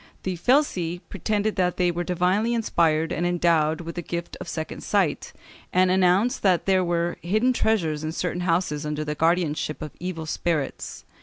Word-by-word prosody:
The 185 -1 -2
felsi 180 - +1
pretended 210 +2 -1
that 180 -1 +1
they 180 -1 +2
were 175 +1 -2
divinely 185 +6 +1
inspired 165 -7 +1
and 165 - -1
endowed 170 -2 +2
with 170 0 -6
the 175 - -4
gift 170 +1 -5
of - - -6
second 160 -1 -5
sight, 190 -8 0 0.4
and 185 0 +3
announced 190 +7 +3
that 185 -4 +2
there 190 -1 +3
were 170 0 -1
hidden 215 +8 +2
treasures 165 -11 0
in 155 - -2
certain 175 +1 -2
houses 165 -4 0
under 150 0 -2
the 150 - -2
guardianship 160 -1 0
of 155 -2 -6
evil 175 -2 -4
spirits. 155 -3 -3
175 Hz, 170 wpm, -25 LUFS, 160-185 Hz, 0.4 s, and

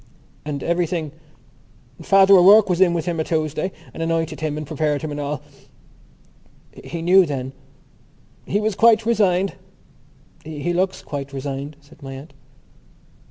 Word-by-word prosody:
"And 145 -2 -4
everything...?" 170 -3 -1 0.9
"Father 195 0 +5
O'Rourke 195 +2 +7
was 180 +1 0
in 175 -2 +4
with 165 -2 -2
him 170 -2 -2
a - - +1
Tuesday 155 +3 -2 0.2
and - - -7
anointed 165 -1 -2
him 155 -1 -3
and 155 - -5
prepared 150 0 -2
him 155 - -4
and 145 - -5
all." 145 0 -4 1.4
"He 170 -1 -6
knew 185 +3 +6
then?" 135 -5 -4 0.9
"He 205 - 0
was 215 0 -1
quite 225 +2 +4
resigned." 195 -5 +1 0.9
"He 160 +2 -4
looks 185 +2 -1
quite 140 -1 -6
resigned," 140 +2 -5
said 150 +2 -20
my 135 -1 -8
aunt. 140 +3 -11
165 Hz, 145 wpm, -21 LUFS, 145-185 Hz, 1.4 s, O'Rourke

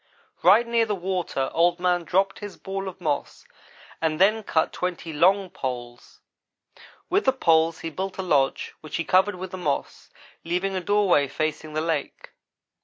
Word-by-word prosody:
"Right 205 +7 +6
near 235 -1 +1
the 210 - 0
water 180 -7 -2
Old 175 +1 +3
man 180 -1 +1
dropped 195 +3 +1
his 205 -2 -8
ball 195 0 -5
of 190 -1 -8
moss 150 -5 -3 0.6
and 160 -1 0
then 215 +4 +4
cut 160 -6 0
twenty 175 -2 -4
long 185 +4 +3
poles. 120 -7 -6 0.9
With 390 +3 +1
the 265 - +5
poles 165 -9 +2
he 165 - -5
built 190 +4 -4
a 190 - -3
lodge 140 -6 +1
which 155 - -7
he 170 - -1
covered 190 +4 +3
with 185 0 -7
the 185 - -6
moss, 150 -6 -3 0.3
leaving 180 +3 -1
a 185 - -1
doorway 190 -7 +3
facing 155 +2 -3
the 155 - +1
lake. 160 -2 -3
180 Hz, 170 wpm, -25 LUFS, 160-195 Hz, 0.9 s, Right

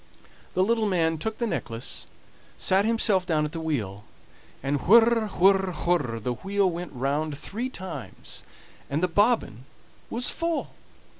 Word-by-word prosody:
The 185 - +4
little 225 +1 +2
man 165 -4 +1
took 220 +5 -3
the 235 - -1
necklace, 115 - -3 0.5
sat 195 +2 +3
himself 220 -4 +2
down 155 -4 +1
at 150 - -4
the 165 - -5
wheel, 110 -11 -3 0.6
and 140 +1 0
whir, 230 +1 +6
whir, 190 0 +4
whir, 145 -10 +1
the 125 +3 -2
wheel 195 +6 0
went 175 +1 -5
round 145 +3 -1
three 230 - -4
times, 165 - -7 0.5
and 150 +5 -1
the - - +4
bobbin 205 - +1 0.4
was 240 +2 0
full. 335 -1 -1
180 Hz, 145 wpm, -26 LUFS, 145-215 Hz, 0.6 s, whir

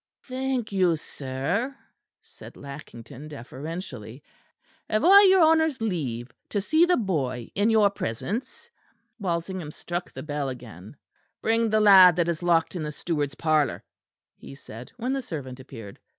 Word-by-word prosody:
"Thank 260 -3 -3
you, 185 -4 +3
sir," 155 - -3 0.5
said - - -14
Lackington 140 -1 -10
deferentially. 140 - -8 0.7
"Have 215 +7 +1
I 395 +3 +9
your 375 -2 +6
honour's 320 -3 +3
leave 135 - -3 0.2
to 205 - -1
see 315 - +3
the 360 - +3
boy 135 - -2
in 205 +3 +2
your 215 -3 +4
presence?" 200 - -5 0.5
Walsingham 175 -3 -3
struck 175 +3 -5
the - - -8
bell 145 -2 -3
again. 115 - -10 0.5
"Bring 225 0 +2
the 215 0 +3
lad 190 -4 +8
that 170 -1 +1
is 170 -1 -2
locked 170 0 +2
in 175 - -3
the 150 -1 -3
steward's 150 -3 -3
parlour," 155 -2 +1 0.5
he - - -12
said, 120 -2 -11
when 250 +2 -2
the 270 - -1
servant 140 - -7
appeared. 115 -6 -11
170 Hz, 145 wpm, -26 LUFS, 135-215 Hz, 0.7 s, I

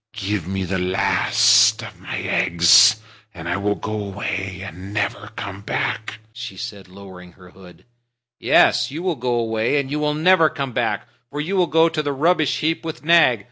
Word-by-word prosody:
Give 100 -5 -3
me 95 0 -3
the 95 +1 -2
last 90 +1 +3
of - - -11
my - - -6
eggs, 85 +5 +4 0.4
and 85 -1 -8
I 90 - -1
will 100 +1 -1
go 110 -1 -5
away 95 -2 -5
and 95 +2 -9
never 105 -1 -2
come 100 -1 -7
back," 110 +1 -3 0.2
she 120 -5 -8
said, 100 -5 -8
lowering 90 -2 -13
her 90 -1 -17
hood. 90 -2 -17 0.5
"Yes, 120 0 +3
you 155 +5 -6
will 180 -3 -1
go 125 -2 -2
away, 115 +3 0
and 135 -1 -4
you 150 - -2
will 150 0 -1
never 165 0 +4
come 135 -2 -5
back. - - -2 0.2
For 145 - -6
you 170 +7 -3
will 180 -2 +2
go 165 0 +3
to 165 -2 -2
the 145 -1 -3
rubbish 155 +2 +1
heap 160 +2 -1
with 160 -2 -7
Nag. 165 -8 +4
110 Hz, 185 wpm, -20 LUFS, 95-150 Hz, 0.5 s, eggs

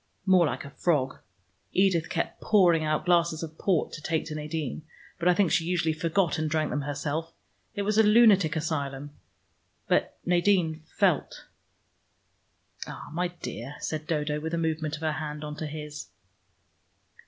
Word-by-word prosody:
"More 185 -4 +5
like - - -4
a 140 - -9
frog. 135 -4 0 0.5
Edith 185 -4 +2
kept 170 - -3
pouring 175 -6 +4
out 155 +2 0
glasses 170 -2 +2
of 160 0 -8
port 185 -6 +1
to 155 - -7
take 160 +1 -1
to 155 - -6
Nadine, 155 -2 -4 0.4
but 170 - 0
I 180 - +5
think 190 -3 +2
she 160 - +3
usually 165 -2 +1
forgot 165 +1 0
and 155 0 -1
drank 155 -1 0
them 145 - -1
herself. 145 +3 -3 0.4
It 205 - -1
was 215 +2 +1
a - - +9
lunatic 210 -7 +5
asylum. 145 -3 -3 0.8
But - - +1
Nadine 175 -3 +2
felt." - - 0 1.4
"Ah, - - -8
my 180 +2 0
dear," 150 -6 -7
said 155 -1 -4
Dodo, 150 -2 -1
with 160 +2 -3
a - - -1
movement 160 -2 -1
of 150 - -11
her 160 -1 0
hand 150 -1 -5
on 150 0 -5
to 155 - -4
his. 150 -1 -7
160 Hz, 165 wpm, -27 LUFS, 150-175 Hz, 1.4 s, a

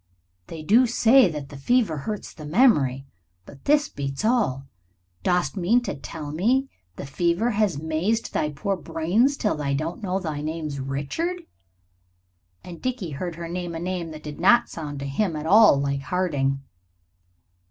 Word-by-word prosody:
They 160 -2 -8
do 235 +10 +5
say 235 -1 +5
that 150 -4 -6
the 140 - -9
fever 205 - +1
hurts 210 +9 -5
the 155 - -11
memory, 145 - +3 0.4
but 135 - -15
this 295 +1 +3
beats 140 - -4
all. 210 - +1 0.6
Dost 180 +1 +1
mean 195 +6 +3
to - - -3
tell 150 +1 -7
me 245 - +1 0.3
the - - -7
fever 170 - 0
has 205 -7 +1
mazed 160 +9 -1
thy 150 - 0
poor 150 +7 -2
brains 190 - +1
till 210 - 0
thou 140 -2 -2
don't 160 +7 -3
know 190 -2 -1
that 180 - -6
thy 150 -2 -3
name's 155 -2 -4
Richard 145 - -3 0.6
?" 90 0 -44
And 175 -2 -10
Dickie 245 -10 -3
heard 170 +4 -4
her 170 0 -6
name 175 0 -4
a - - -4
name 175 -1 -3
that 155 -1 -10
did 150 -1 -8
not 240 0 +5
sound 150 -3 -6
to - - -4
him 165 +5 -1
at 150 0 -5
all 205 -4 +6
like 140 0 -1
Harding. 140 -5 -1
165 Hz, 175 wpm, -24 LUFS, 140-210 Hz, 0.6 s, all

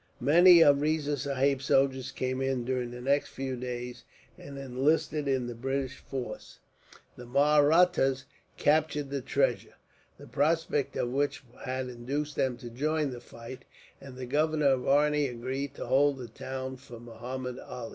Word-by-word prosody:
Many 170 +6 +7
of 140 -2 +5
Riza 150 -1 0
Sahib's 140 -1 0
soldiers 135 -1 +2
came 130 0 -2
in, 135 -2 -1
during 125 -1 -2
the 125 0 -8
next 140 +3 +1
few 130 -1 -4
days, 125 0 -6 0.3
and 140 -1 -10
enlisted 140 +3 0
in 130 -2 +1
the 120 - -5
British 135 +2 -3
force. 130 -2 -7 0.6
The 125 - -11
Mahrattas 145 0 +3 0.3
captured 150 -2 +1
the 140 -1 -2
treasure, - - 0 0.4
the - - -12
prospect 150 -1 0
of 120 - -1
which 140 +1 -1 0.2
had 130 0 -3
induced 140 +5 -4
them 130 -2 0
to 120 -2 -9
join 155 +6 -1
in - - -6
the 120 -1 -8
fight, 115 +2 -11 0.4
and 135 -2 -11
the 130 - -5
governor 150 +2 +2
of 130 -2 0
Arni 150 +1 +3
agreed 130 +3 -4
to - - -6
hold 140 +1 +3
the 125 -2 -7
town 130 +3 -6
for 125 -3 -12
Muhammud 125 +2 -6
Ali. 125 -2 -7
135 Hz, 160 wpm, -29 LUFS, 125-145 Hz, 0.6 s, Many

